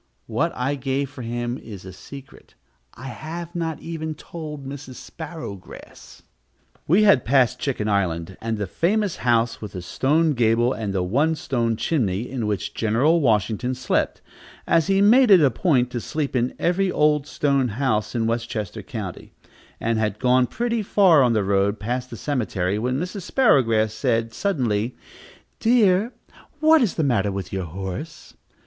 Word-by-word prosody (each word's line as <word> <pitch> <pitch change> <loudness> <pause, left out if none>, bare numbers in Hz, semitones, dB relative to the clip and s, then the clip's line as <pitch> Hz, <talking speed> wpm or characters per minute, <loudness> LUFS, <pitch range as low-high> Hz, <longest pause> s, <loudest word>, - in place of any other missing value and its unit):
What - - -1
I 130 +3 -1
gave 135 0 -2
for 140 - -9
him 120 +1 -3
is 100 -5 -10
a 95 - -9
secret; 135 +8 -13 0.4
I 135 - -8
have 165 +5 -7
not 165 -2 -3
even 160 -2 -5
told 150 -3 -8
Mrs. 135 -1 -8
Sparrowgrass.... 160 - -10 0.6
We 185 +8 +4
had 200 - +5
passed 130 -1 +2
Chicken 125 -6 -2
Island, 95 -3 -1
and 115 -1 -2
the 105 - -2
famous 195 - 0
house 115 -1 +1
with 105 -3 -7
the 90 - -5
stone 150 - +1
gable 120 0 +2
and 105 -2 -4
the 95 -2 -1
one 140 - +1
stone 120 -6 -1
chimney, 110 - -1
in 125 -5 -3
which 105 -3 -3
General 130 +10 +2
Washington 115 +1 +1
slept, 125 0 -1 0.4
as 165 0 +2
he 195 0 +3
made 245 +4 +6
it 195 -3 +8
a 140 -4 +4
point 125 -3 +1
to 120 - -3
sleep 145 0 -3
in 125 0 0
every 185 +2 +1
old 150 -2 +2
stone 140 -4 +1
house 110 -2 -1
in 115 -1 0
Westchester 115 -3 -3
County, - - -7 0.5
and 115 -1 0
had 105 -2 -1
gone 125 +1 +3
pretty 235 - -1
far 190 -6 +5
on 125 -3 +3
the 105 -2 +1
road, 100 +1 +1
past 125 +4 -3
the - - -8
cemetery, 105 -8 -1
when 125 +4 -1
Mrs. 185 +4 -4
Sparrowgrass 115 - +2
said 115 -1 -1
suddenly, 125 - -1 0.6
"Dear, 220 -2 +3 0.5
what 315 0 +5
is 225 -7 +1
the 160 - 0
matter 105 -7 +1
with 95 0 -5
your 95 -2 -2
horse?" 95 - -7
125 Hz, 165 wpm, -23 LUFS, 110-160 Hz, 0.6 s, it